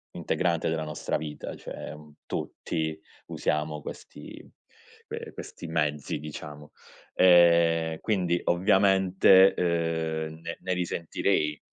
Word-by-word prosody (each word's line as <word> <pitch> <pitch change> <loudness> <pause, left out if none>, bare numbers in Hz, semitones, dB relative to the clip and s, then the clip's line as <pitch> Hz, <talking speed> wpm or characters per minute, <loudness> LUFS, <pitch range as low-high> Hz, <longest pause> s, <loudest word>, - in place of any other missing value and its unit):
integrante 85 -3 0
della 80 -1 -1
nostra 75 0 -3
vita, 75 -1 -6
cioè - - -8
un 75 -1 -14
tutti, 80 -1 -3 0.3
usiamo 75 0 -2
questi, - - -10 0.7
ehm, - - -7
questi - - -9
mezzi 75 -3 -1
diciamo, 75 -1 -9 0.4
ehm, 85 -2 +5
quindi 90 -5 0
ovviamente, 95 +1 +5
uhm, 80 -2 -1
ne 85 0 -6
ne 95 - -1
risentirei 85 -3 -1
80 Hz, 100 wpm, -27 LUFS, 75-90 Hz, 0.7 s, ehm